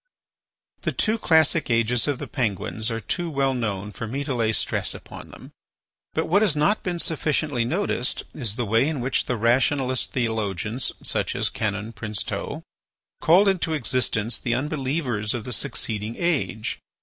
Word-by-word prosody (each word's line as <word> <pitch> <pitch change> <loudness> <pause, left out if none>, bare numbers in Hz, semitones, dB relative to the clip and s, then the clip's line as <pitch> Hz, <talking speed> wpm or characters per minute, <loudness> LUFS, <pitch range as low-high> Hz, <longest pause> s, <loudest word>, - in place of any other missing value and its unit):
The - - 0
two 220 +1 +1
classic 160 - +3
ages 115 +1 +2
of 145 -3 +1
the - - -5
Penguins 110 -1 -1
are 115 -1 -2
too 175 - -2
well 135 -3 +1
known 105 -5 -2
for 115 - -5
me 135 +6 -2
to 140 - -2
lay 115 -3 +1
stress - - 0
upon - - -10
them. - - -12 0.6
But - - +1
what 200 +5 +3
has 200 -9 +4
not 150 +8 +2
been 180 -2 -2
sufficiently 150 -6 0
noticed 135 -3 0
is 115 -8 -1
the 120 -1 -1
way 115 +6 +3
in 155 -4 -2
which 130 +2 0
the 125 - 0
rationalist 130 +3 +2
theologians 110 -1 -1
such - - -1
as - - +1
Canon 105 +1 -2
Princeteau 105 -3 -3 0.6
called 185 +6 +6
into 175 -4 +2
existence 120 -4 0
the 120 -1 0
unbelievers 130 -6 -1
of 120 - -3
the 125 - -3
succeeding 110 -3 -2
age. 150 -10 0
125 Hz, 160 wpm, -24 LUFS, 110-150 Hz, 0.6 s, called